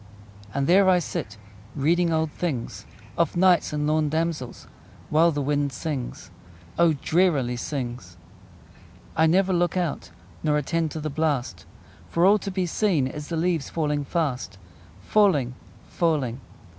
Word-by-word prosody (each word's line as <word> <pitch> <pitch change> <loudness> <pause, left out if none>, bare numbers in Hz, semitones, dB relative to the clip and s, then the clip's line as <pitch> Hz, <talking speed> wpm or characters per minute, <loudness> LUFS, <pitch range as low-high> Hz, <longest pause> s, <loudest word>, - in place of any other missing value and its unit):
And 140 +6 -1
there 190 +4 +5
I 185 - +5
sit 105 - -4 0.4
Reading 165 +4 +2
old 160 -1 0
things, 145 -10 -4 0.3
Of 170 0 +1
knights 180 -1 +4
and 150 0 -1
lorn 155 0 +1
damsels, 160 -5 -3 0.5
While 160 +3 +5
the 145 -2 -2
wind 145 0 0
sings 130 - -5 0.5
O, 170 -2 +5
drearily 150 -5 +1
sings! 120 - -5 1.0
I 160 +1 +4
never 190 +3 +3
look 175 +1 +1
out 175 -5 -2 0.3
Nor 150 -1 +1
attend 165 +2 -1
to 155 - -6
the 155 0 -4
blast; 140 -5 -2 0.4
For 170 +1 +2
all 205 +2 +5
to 200 - -5
be 185 -1 -1
seen 175 -5 +1
Is 145 +3 -6
the 165 - -3
leaves 165 -3 0
falling 150 -3 -1
fast: 135 - -2 0.4
Falling, 150 - +2 0.3
falling! 140 -7 -1
155 Hz, 145 wpm, -25 LUFS, 140-170 Hz, 1.0 s, there